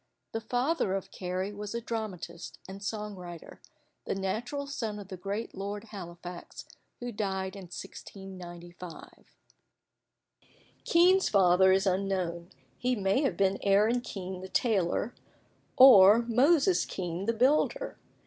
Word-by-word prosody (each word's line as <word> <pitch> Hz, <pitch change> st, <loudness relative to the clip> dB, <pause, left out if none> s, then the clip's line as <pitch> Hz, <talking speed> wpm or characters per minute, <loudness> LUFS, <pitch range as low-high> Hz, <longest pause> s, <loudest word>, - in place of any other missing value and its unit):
The 225 Hz, -, -3 dB
father 245 Hz, -, 0 dB
of 195 Hz, -, -5 dB
Carey 185 Hz, +2 st, -3 dB
was 205 Hz, +2 st, -6 dB
a -, -, 0 dB
dramatist 215 Hz, -7 st, -6 dB
and 195 Hz, +1 st, -9 dB
song 210 Hz, 0 st, -4 dB
writer, 175 Hz, -2 st, -10 dB, 0.4 s
the -, -, -2 dB
natural 240 Hz, +9 st, -3 dB
son 225 Hz, -7 st, -4 dB
of 200 Hz, -2 st, -9 dB
the 185 Hz, -, -5 dB
great 200 Hz, +5 st, -4 dB
Lord 200 Hz, +2 st, -5 dB
Halifax, 175 Hz, -4 st, -9 dB, 0.3 s
who 245 Hz, 0 st, -5 dB
died 190 Hz, -3 st, -3 dB
in 195 Hz, -2 st, -8 dB
1695. 180 Hz, -2 st, -10 dB, 1.5 s
Kean's 365 Hz, +3 st, +5 dB
father 190 Hz, -1 st, +5 dB
is 190 Hz, +1 st, +3 dB
unknown: 185 Hz, -3 st, -1 dB, 0.3 s
he 250 Hz, 0 st, +1 dB
may 200 Hz, +4 st, +1 dB
have 275 Hz, -, 0 dB
been 195 Hz, 0 st, +2 dB
Aaron 210 Hz, +5 st, +3 dB
Kean 190 Hz, -5 st, -6 dB
the 190 Hz, -, -8 dB
tailor, 210 Hz, 0 st, +1 dB, 0.6 s
or 230 Hz, -4 st, +9 dB
Moses 280 Hz, -, +3 dB
Kean 180 Hz, +2 st, -4 dB
the 230 Hz, -, +2 dB
builder. 300 Hz, -, +1 dB
200 Hz, 130 wpm, -29 LUFS, 185-230 Hz, 1.5 s, or